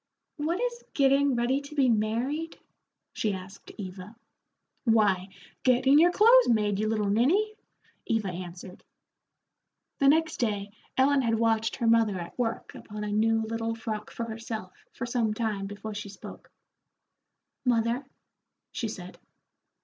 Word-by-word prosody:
"What 320 +5 -1
is 480 0 -2
getting 275 -1 +4
ready 245 +4 +1
to 285 +1 -11
be 275 -3 +4
married?" 240 +9 0 0.6
she 215 -2 -1
asked 190 +1 -10
Eva. 190 +1 -8 0.7
"Why, 205 -5 +3 0.3
getting 265 +3 +5
your 345 +2 +6
clothes 470 +6 +6
made, 210 -3 +2
you 215 - 0
little 215 -2 0
ninny," 355 - +2 0.5
Eva 225 -4 0
answered. 180 +1 -8 1.2
The 275 - +4
next 320 +2 +3
day 205 -4 -1 0.3
Ellen 275 +1 +4
had 230 -2 +1
watched 225 -1 +1
her 240 - -2
mother 225 -4 +4
at 170 -1 -7
work 230 -2 -2
upon 210 0 -8
a 210 - -3
new 225 +1 +2
little 225 +1 -2
frock 220 -2 -5
for 230 - -5
herself 220 -4 -6 0.2
for - - -5
some 235 -3 0
time 210 -3 -2
before 205 +2 -7
she 205 0 -6
spoke. 195 - -11 1.1
"Mother," 235 +1 +1 0.7
she 230 - -3
said. 185 -4 -8
225 Hz, 140 wpm, -28 LUFS, 210-265 Hz, 1.2 s, your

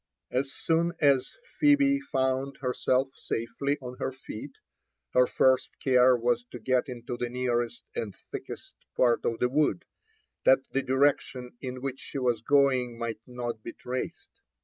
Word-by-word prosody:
As 135 +2 0
soon 170 +3 +1
as 140 -3 +4 0.3
Phebe 280 -2 +5
found 135 - -1
herself 130 0 +1
safely 125 +5 -2
on 125 -1 -7
her - - -1
feet, 130 +1 -9 0.6
her 125 0 +5
first 130 -1 +2
care 125 -1 +5
was 120 0 +1
to 125 - -9
get 130 +2 0
into 120 0 -5
the 120 - -2
nearest 120 -1 -1
and 105 -4 -4 0.2
thickest - - -7 0.2
part 120 -2 +3
of 115 - 0
the 125 - +2
wood, 130 - +1 0.6
that 135 0 +4
the 135 - +1
direction 130 -1 +1
in 130 -1 -6
which 135 -1 -3
she - - -7
was 120 -4 +1
going 130 -3 +3
might 115 -2 -4
not 120 -3 -5
be 115 - -7
traced. 125 +1 -6
125 Hz, 150 wpm, -28 LUFS, 120-135 Hz, 0.6 s, Phebe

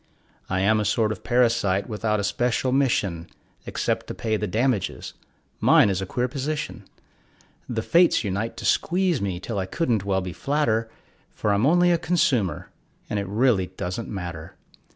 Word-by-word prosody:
I 95 0 0
am 110 +3 +3
a - - 0
sort 105 +1 +1
of 105 - -6
parasite 115 -6 +2
without 105 -1 -1
a - - -1
special 120 +4 0
mission 100 -11 0 0.4
Except - - -2
to - - -6
pay 110 -1 -1
the 105 0 -2
damages 115 +1 -1 0.5
mine 100 - +5
is 95 0 -1
a 95 - -4
queer 125 +5 -1
position: 145 +4 -4 0.8
The 115 -2 -2
Fates 170 0 +4
unite 105 +3 -3
to - - -6
squeeze 180 -3 +1
me 95 -3 -2
till 100 +2 -4
I 95 - -2
couldn't 115 - 0
well 95 -1 0
be 90 -1 -5
flatter, 115 - 0 0.5
For 105 - 0
I'm 105 +6 +2
only 175 +2 +4
a 170 - +2
consumer, 155 - 0 0.4
and 105 - 0
it 100 - -4
really 105 -2 +2
doesn't 90 +6 -4
matter. 85 -5 -6
110 Hz, 170 wpm, -24 LUFS, 95-130 Hz, 0.8 s, mine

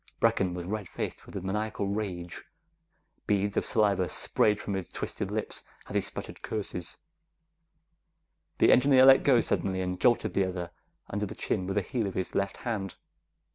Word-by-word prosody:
Brecken 90 -2 +2
was 90 -1 -5
red 105 0 -4
faced - - -5
with - - -12
a 100 - -3
maniacal 105 +2 -2
rage. 95 -4 -4 0.8
Beads 100 -1 +1
of - - +2
saliva 100 -4 +2
sprayed 105 -1 +2
from 100 - -4
his 95 -3 -3
twisted - - -4
lips - - -4 0.2
as - - -8
he - - +2
sputtered - - -5
curses. 100 -5 -4 1.6
The - - +5
engineer 130 0 +6
let 135 0 +8
go 125 -4 +5
suddenly 95 -3 -1
and 90 0 -3
jolted 120 -2 +3
the 95 -1 +2
other 90 -2 -5 0.4
under 105 +1 -1
the 105 - -8
chin 95 -3 -2
with 95 - -2
the 105 - +1
heel 115 +1 -2
of 95 - -6
his 95 - -2
left 100 0 -1
hand. 100 -6 -3
100 Hz, 175 wpm, -29 LUFS, 95-110 Hz, 1.6 s, let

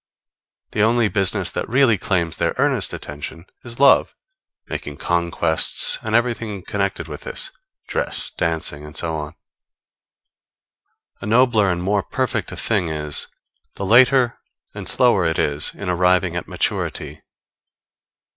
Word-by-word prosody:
The 105 - 0
only 115 0 +3
business 95 -3 0
that - - -4
really 125 -2 +4
claims 85 -4 -1
their - - 0
earnest - - +2
attention 75 +3 -7 0.2
is 120 0 -6
love, 140 0 +5 0.5
making 75 -1 -6
conquests, 85 -1 +1
and 110 0 -2
everything 115 -5 0
connected 100 -5 -2
with 75 -2 -8
this - - -5 0.4
dress, - - 0
dancing, 80 -3 -2
and 75 +1 -10
so 80 -2 -2
on. 75 -1 -5 1.8
The - - -6
nobler 115 -3 +4
and 90 0 -2
more 100 +2 +1
perfect - - -2
a - - -7
thing 100 -6 0
is, 75 -2 -4 0.5
the 100 - -4
later 125 +2 +5 0.3
and - - -6
slower 120 -7 +4
it 80 -1 0
is 75 0 +1
in 100 - -7
arriving 90 0 +2
at 90 - -4
maturity. - - -3
95 Hz, 135 wpm, -21 LUFS, 80-110 Hz, 1.8 s, love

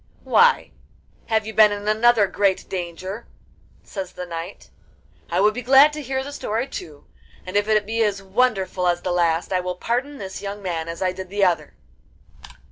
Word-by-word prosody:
'Why, 480 +1 +4 0.6
have 220 -2 +1
you 220 - -6
been 215 -1 +6
in 205 0 -5
another 220 0 +4
great 195 -1 0
danger?' 185 +4 -6 0.6
says 190 -2 -7
the 180 - -6
knight. 170 +2 -8 0.6
'I 175 +2 +1
would 210 +1 +4
be 250 - -4
glad 270 +4 +6
to 300 - -5
hear 265 -1 -2
the 285 - -7
story 230 -4 -2
too, 155 - -9 0.4
and 185 +1 -7
if 205 0 +2
it 215 -1 +2
be 225 +2 -1
as 200 -2 0
wonderful 195 -3 0
as 175 0 0
the 180 - -1
last, 170 +1 +1
I 185 - +2
will 180 0 -3
pardon 250 +9 -2
this 190 -5 -7
young 200 +1 -5
man 165 -3 -3
as 170 +2 -4
I 185 - +1
did 185 0 -8
the 200 +1 0
other. 165 -5 -1
200 Hz, 190 wpm, -22 LUFS, 180-225 Hz, 0.6 s, been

